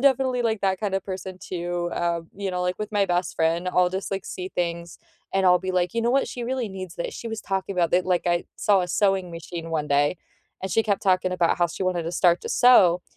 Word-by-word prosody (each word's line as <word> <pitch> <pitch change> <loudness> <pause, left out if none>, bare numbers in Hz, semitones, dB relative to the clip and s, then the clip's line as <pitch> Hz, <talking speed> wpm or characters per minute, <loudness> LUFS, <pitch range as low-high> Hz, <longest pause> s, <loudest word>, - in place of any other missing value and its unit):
definitely, 260 -2 +3
like, 220 -3 0
that 190 0 +1
kinda 195 -2 0
person 185 -1 -6
too, 175 -1 -3
um, 170 -1 -2
you 195 -1 -3
know, 180 0 -2
like 180 0 -1
with 210 0 -4
my 205 -1 +3
best 175 +1 -1
friend, 165 +2 +1
I'll 180 0 +3
just 190 +2 -4
like 195 -1 -3
see 185 0 -6
things 170 -1 -3 0.4
and 195 0 +2
I'll 180 -1 +6
be 185 +1 -4
like, 180 +1 +1
"You 230 - 0
know 235 - +2
what? 275 +1 +2
She 245 - -6
really 250 -1 -2
needs 185 -2 -7
this, 170 - -4
she 230 - -6
was 225 -1 -5
talking 195 0 -2
about 170 -2 +2
thi" 180 - +5
like 180 -1 0
I 175 0 +1
saw 200 -3 +3
a 180 - -2
sewing 195 -2 +1
machine 165 0 -7
one 150 -2 -1
day, 145 +4 +2 0.5
and 190 - -3
she 225 - +3
kept 200 -3 -1
talking 185 -1 +2
about 175 -1 +1
how 175 - +4
she 170 - -6
wanted 180 -3 0
to 170 - -4
start 175 0 +3
to - - -5
sew, 185 -9 +5
185 Hz, 250 wpm, -24 LUFS, 175-200 Hz, 0.5 s, I'll